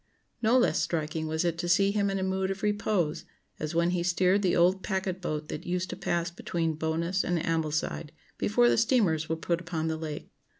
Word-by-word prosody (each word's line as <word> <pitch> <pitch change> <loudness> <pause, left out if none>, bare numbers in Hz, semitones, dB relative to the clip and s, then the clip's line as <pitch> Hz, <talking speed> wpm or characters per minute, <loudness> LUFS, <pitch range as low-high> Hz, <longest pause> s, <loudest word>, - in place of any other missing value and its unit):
No 235 +2 +4
less 245 - +3
striking 160 -1 -2
was 160 +2 -1
it 170 -1 -1
to 175 0 -2
see 195 +3 +4
him 200 -1 +1
in 195 - -1
a 190 - -1
mood 190 0 0
of 195 +1 -4
repose, 205 -6 0 0.4
as 155 +2 -4
when 170 +1 +3
he 180 -1 0
steered 180 +3 +2
the 185 -3 +2
old 180 +2 +3
packet 190 -2 -2
boat 155 -3 -3
that - - -5
used 180 +1 -1
to - - -4
pass 170 0 -1
between 170 -2 -2
Bowness 165 +4 -1
and 175 - 0
Ambleside, 155 -1 -1 0.3
before 240 +4 +3
the - - +3
steamers 205 - +2
were 160 - +1
put 170 +1 -1
upon 165 -2 -2
the 160 - -2
Lake. 155 -2 -6
175 Hz, 210 wpm, -28 LUFS, 160-190 Hz, 0.4 s, No